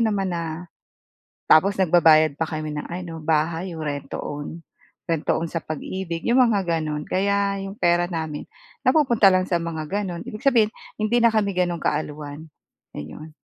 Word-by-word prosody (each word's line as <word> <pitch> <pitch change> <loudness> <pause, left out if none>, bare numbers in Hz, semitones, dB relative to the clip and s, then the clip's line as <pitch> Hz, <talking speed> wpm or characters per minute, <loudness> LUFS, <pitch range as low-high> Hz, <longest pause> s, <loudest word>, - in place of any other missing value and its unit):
naman 200 -3 0
na 170 - -2 1.1
tapos 195 +6 +5
nagbabayad 160 -4 +5
pa 160 +2 -2
kami 155 -1 -4
ng 150 - -5
ano, 170 -2 -6
bahay 160 +3 0
'yong 160 - -5
rent 145 -2 -4
to - - -3
own. 145 +3 -6 0.5
Rent 165 -2 -1
to - - +4
own 165 - -2
sa 165 - -2
Pag-Ibig 170 +2 -5
'yong 250 +2 +5
mga 200 -2 +2 0.2
gano'n, 150 -1 -3
kaya 200 +1 0
'yong 195 +1 -7
pera 175 -2 +3
namin 160 -4 -4 0.4
napupunta 240 -10 +5
lang 185 0 +2
sa 175 -2 0
mga 160 -2 -4
gano'n, 190 -3 -3
ibig 215 - -7
sabihin 230 -6 +4 0.3
hindi 215 +3 +1
na 235 - +6
kami 205 -2 +1
gano'n 175 -1 +1
kaalwan, 150 0 -3 0.5
ayon. 80 - -8
170 Hz, 170 wpm, -23 LUFS, 155-200 Hz, 1.1 s, na